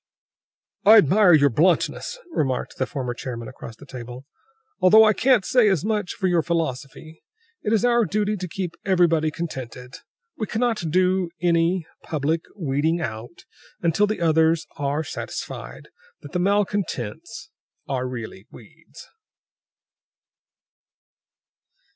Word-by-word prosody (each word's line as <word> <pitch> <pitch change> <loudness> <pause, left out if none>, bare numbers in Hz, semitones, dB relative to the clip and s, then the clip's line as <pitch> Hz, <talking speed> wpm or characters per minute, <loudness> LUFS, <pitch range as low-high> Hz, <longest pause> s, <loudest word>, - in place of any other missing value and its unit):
"I 220 +2 +8
admire 190 +1 +5
your 145 -3 +5
bluntness," 175 - +1
remarked 135 - -2
the 130 - -1
former 130 -4 -4
chairman 120 -2 -6
across 115 -3 -10
the 145 - -15
table, 125 0 -9 0.5
"although 215 +4 +7
I 215 0 +5
can't 240 0 +3
say 245 -4 +4
as 190 -3 0
much 210 -4 -1
for 195 - -4
your 175 -2 +3
philosophy. 160 -1 -4 0.4
It 210 - -2
is 225 0 +2
our 240 -2 +3
duty 210 +3 -1
to 185 -2 -5
keep 180 0 -4
everybody 170 -5 +2
contented; 130 -6 -7 0.4
we 215 - -4
cannot 230 -2 -1
do 185 +1 +2
any 170 0 +1 0.2
public 155 +2 -1 0.2
weeding 160 0 0
out 120 0 -7 0.4
until 170 +5 +2
the 215 -3 -3
others 160 0 +3
are 145 +1 -2
satisfied - - -7 0.3
that - - -11
the 180 - -1
malcontents 200 - -2 0.4
are 130 -2 -2
really 115 -5 -8
weeds." - - -15
165 Hz, 125 wpm, -23 LUFS, 140-200 Hz, 0.5 s, I